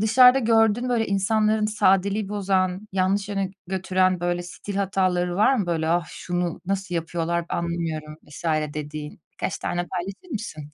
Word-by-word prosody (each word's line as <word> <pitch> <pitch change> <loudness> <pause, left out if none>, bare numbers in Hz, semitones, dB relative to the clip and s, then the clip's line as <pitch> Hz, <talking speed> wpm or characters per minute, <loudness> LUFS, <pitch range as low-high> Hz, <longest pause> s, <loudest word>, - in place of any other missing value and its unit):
dışarıda 250 +4 +7
gördüğün 225 0 +3
böyle 235 -2 +1
insanların 215 +2 +2
sadeliği 200 -1 +2
bozan, 190 -1 0
yanlış 195 +2 +1
yöne 195 -2 -1 0.2
götüren 185 -1 +1
böyle 175 0 -1
stil 195 +3 -7
hataları 185 -2 +1
var 215 +7 +4
mı? 205 -7 0
Böyle, 160 -2 0
"Ah, 170 +1 +2
şunu 175 -1 -3
nasıl 190 -2 -2
yapıyorlar 170 0 -1
anlamıyorum." 165 -3 -3
vs. 150 +3 -12 0.3
dediğin? 150 0 -6
Birkaç 175 - -3
tane 175 0 -2
paylaşır 190 - -6
mısın? 155 -9 -6
185 Hz, 145 wpm, -24 LUFS, 175-205 Hz, 0.3 s, dışarıda